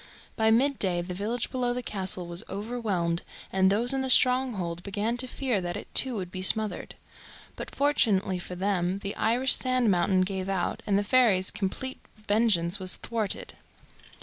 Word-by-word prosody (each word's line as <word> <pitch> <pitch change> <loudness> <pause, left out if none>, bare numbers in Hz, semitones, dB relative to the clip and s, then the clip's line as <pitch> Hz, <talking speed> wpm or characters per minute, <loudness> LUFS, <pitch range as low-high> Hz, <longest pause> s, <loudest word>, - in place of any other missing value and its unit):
By 220 0 +2
mid 260 +5 +2
day 175 -3 +1
the 180 +1 -6
village 215 +5 -3
below 245 -2 -1
the 250 - -4
castle 190 -4 -1
was 170 +1 -1
overwhelmed, 200 -6 -2 0.3
and 190 0 +4
those 235 +5 +1
in 270 - 0
the 265 - -2
stronghold 245 -11 +2
began 205 +4 -2
to 255 +1 +2
fear 250 -6 -1
that 175 -1 -4
it - - -10
too 260 -2 +3
would 185 -4 -5
be 185 - -5
smothered. 215 +3 +1 0.6
But - - -7
fortunately 205 -10 +1
for 180 +1 -7
them 185 -1 -1
the 200 0 -5
Irish 245 +4 +2
sand 255 -4 +1
mountain 185 +1 +2
gave 190 0 -2
out, 190 -3 -2
and 200 -1 +2
the 205 - +1
fairies' 205 -5 +3
complete 240 +7 -4 0.3
vengeance 205 -4 +2
was 185 -1 +2
thwarted. 225 -3 -3
205 Hz, 175 wpm, -27 LUFS, 185-245 Hz, 0.6 s, and